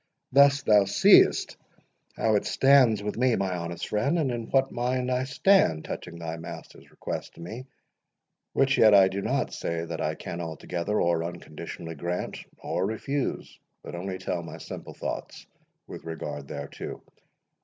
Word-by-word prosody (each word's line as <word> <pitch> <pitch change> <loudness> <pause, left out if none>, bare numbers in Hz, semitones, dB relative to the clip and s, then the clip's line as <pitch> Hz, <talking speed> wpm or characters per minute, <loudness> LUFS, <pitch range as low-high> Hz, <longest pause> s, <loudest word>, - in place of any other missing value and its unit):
Thus 140 +1 +5
thou 105 -2 +5
seest 100 +1 +5 0.6
how 110 - +1
it 105 - +2
stands 130 -6 +4
with 105 +1 -3
me, 125 -2 +3
my 95 -2 -1
honest 85 0 -5
friend, 125 +11 +1
and 145 -6 +1
in 115 -2 -4
what 135 0 +2
mind 125 +1 -1
I 125 +1 0
stand 135 - +3
touching 85 -1 -6
thy 85 -1 -5
master's 80 - -10
request - - -6
to - - -12
me; 110 +9 -7 0.9
which 135 0 +2
yet 110 -2 +7
I 95 -1 +7
do 100 +1 -3
not - - -1
say 85 0 -3
that 85 -1 -5
I 80 +1 -1
can 85 +1 -6
altogether, 85 +4 -3
or 85 -1 +1
unconditionally, 85 -1 -7
grant 85 +3 -4 0.2
or 95 - -2
refuse, 135 +6 -3 0.2
but - - -8
only 95 +2 -4
tell 90 - -3
my 85 - -9
simple - - -9
thoughts - - -6 0.4
with - - -9
regard 80 -1 -6
thereto. 70 0 -7
100 Hz, 160 wpm, -27 LUFS, 85-125 Hz, 0.9 s, yet